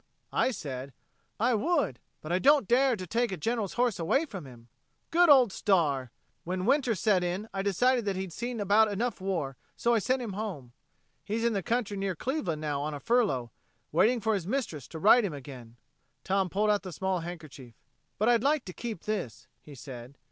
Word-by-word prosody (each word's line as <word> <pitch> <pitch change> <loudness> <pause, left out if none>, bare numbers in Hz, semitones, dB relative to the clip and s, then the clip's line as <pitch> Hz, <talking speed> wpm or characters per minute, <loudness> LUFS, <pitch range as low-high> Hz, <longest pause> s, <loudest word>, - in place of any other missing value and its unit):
I - - +2
said, 135 - -6 0.5
'I 245 +3 +3
would, 275 - 0 0.2
but 155 - -6
I 180 - +2
don't 280 -2 +4
dare 255 +1 +4
to 185 -3 -6
take 235 +6 0
a 190 - -3
General's 225 +2 -2
horse 240 -5 +1
away 270 - +2
from 195 - -8
him.' 120 -2 -14 0.4
Good 345 0 +5
old 260 -7 +7
Star! 145 - +1 0.3
When 185 +1 -3
winter 260 -2 +2
set 195 -2 +2
in 180 +5 -2
I 195 - -1
decided 235 +5 +2
that 200 -2 -1
he'd 190 -2 -4
seen 240 +3 -4
about 210 +2 +4
enough 215 0 -2
war, 165 -9 -2 0.2
so 235 - +2
I 230 - +4
sent 255 +5 0
him 215 -4 -5
home. 185 - -5 0.5
He 210 - -3
is 230 - -1
in 235 -1 +2
the 200 - 0
country 220 0 -1
near 195 -2 -2
Cleveland 185 - -2
now 145 -2 -2
on 150 +1 -3
a - - -6
furlough, 140 - +1 0.4
waiting 240 +2 +3
for 220 0 0
his 190 -4 -2
mistress 200 - -3
to 160 - -8
ride 215 +8 +6
him 190 -6 -2
again." 130 -5 -10 0.5
Tom 190 -1 +1
pulled 210 +4 +2
out 205 - +1
the 185 - -7
small 190 +2 -1
handkerchief. 155 -8 -9 0.4
"But 215 - +1
I'd 240 -2 +4
like 285 +1 +1
to 180 - -7
keep 225 -5 -6
this," 130 - -4 0.2
he 145 - -12
said. 130 0 -10
195 Hz, 205 wpm, -29 LUFS, 155-235 Hz, 0.5 s, old